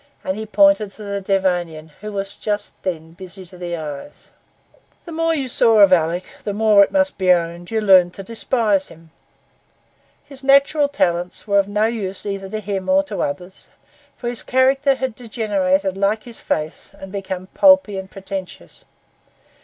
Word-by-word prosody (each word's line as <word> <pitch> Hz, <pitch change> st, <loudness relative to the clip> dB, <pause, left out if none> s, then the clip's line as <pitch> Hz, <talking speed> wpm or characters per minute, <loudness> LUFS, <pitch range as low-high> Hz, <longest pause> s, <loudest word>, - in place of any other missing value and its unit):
And 190 Hz, -, -2 dB
he 220 Hz, +1 st, -6 dB
pointed 225 Hz, -5 st, +3 dB
to 215 Hz, -, -11 dB
the 200 Hz, -1 st, -4 dB
Devonian, 175 Hz, -5 st, -1 dB
who 210 Hz, 0 st, -6 dB
was 195 Hz, -1 st, -4 dB
just 210 Hz, -1 st, -3 dB
then 165 Hz, -3 st, -4 dB
busy 185 Hz, +1 st, -11 dB
to 180 Hz, +1 st, -14 dB
the 175 Hz, -1 st, -4 dB
eyes. 150 Hz, -, -8 dB, 0.7 s
The 340 Hz, -, -9 dB
more 330 Hz, 0 st, 0 dB
you 275 Hz, -4 st, -2 dB
saw 230 Hz, -2 st, +3 dB
of 200 Hz, -3 st, +7 dB
Alick, 170 Hz, +1 st, +2 dB, 0.2 s
the 205 Hz, -, -3 dB
more, 210 Hz, -2 st, +5 dB
it -, -, -2 dB
must 285 Hz, -4 st, +1 dB
be 185 Hz, -1 st, +4 dB
owned, 170 Hz, 0 st, 0 dB
you 225 Hz, -, 0 dB
learned 185 Hz, -3 st, +5 dB
to 195 Hz, -, -8 dB
despise 220 Hz, -2 st, 0 dB
him. 165 Hz, 0 st, -17 dB, 1.1 s
His 275 Hz, -1 st, -12 dB
natural 280 Hz, +2 st, +4 dB
talents 180 Hz, -10 st, -1 dB
were 200 Hz, -1 st, +3 dB
of 195 Hz, -, +1 dB
no 210 Hz, +1 st, +1 dB
use 210 Hz, -5 st, -3 dB
either 195 Hz, -1 st, -4 dB
to 215 Hz, +2 st, -4 dB
himself 210 Hz, +9 st, 0 dB
or -, -, -1 dB
others; 180 Hz, +6 st, -6 dB, 0.5 s
for 240 Hz, -, -6 dB
his 240 Hz, -1 st, -1 dB
character 270 Hz, +2 st, +2 dB
had 260 Hz, -2 st, -3 dB
degenerated 200 Hz, -5 st, -1 dB
like 200 Hz, +3 st, 0 dB
his 240 Hz, -2 st, -7 dB
face, 155 Hz, 0 st, -4 dB
and 195 Hz, -1 st, -9 dB
become 190 Hz, -2 st, -5 dB
pulpy 280 Hz, 0 st, +4 dB
and 190 Hz, 0 st, -9 dB
pretentious. 190 Hz, -, -8 dB
200 Hz, 170 wpm, -20 LUFS, 185-230 Hz, 1.1 s, of